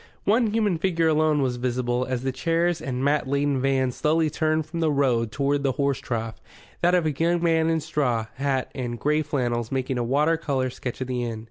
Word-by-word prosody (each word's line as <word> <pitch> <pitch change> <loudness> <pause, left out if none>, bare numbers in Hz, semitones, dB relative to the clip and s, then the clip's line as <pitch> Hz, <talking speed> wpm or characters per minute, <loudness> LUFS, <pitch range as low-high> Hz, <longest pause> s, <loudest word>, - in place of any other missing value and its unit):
One 225 +3 +3
human 210 -5 +1
figure 170 -2 +1
alone 155 -2 +2
was 125 -2 -1
visible, 125 0 -1
as 125 -1 -2
the 135 - 0
chairs 165 +5 0
and 130 -4 -3
mat 145 -1 +1
laden 140 -1 0
van 135 -1 +1
slowly 155 +4 +1
turned 155 0 0
from 165 +2 -6
the 160 -2 +2
road 125 -6 +1
toward 140 0 0
the 135 -2 +1
horse 140 -1 0
trough 115 -2 -4 0.4
that 175 +1 +4
of 175 -3 +2
a 155 - +2
young 170 +4 0
man 165 -1 +3
in 160 -1 +1
straw 125 -7 0
hat 135 -1 -1
and 120 -3 -4
grey 150 +1 +1
flannels 120 -6 -2
making 130 -1 -1
a - - 0
water 150 +7 +2
colour 135 -5 -1
sketch 125 0 -6
of 130 - -2
the 125 -1 -2
inn. 115 -2 -4
140 Hz, 215 wpm, -25 LUFS, 125-160 Hz, 0.4 s, that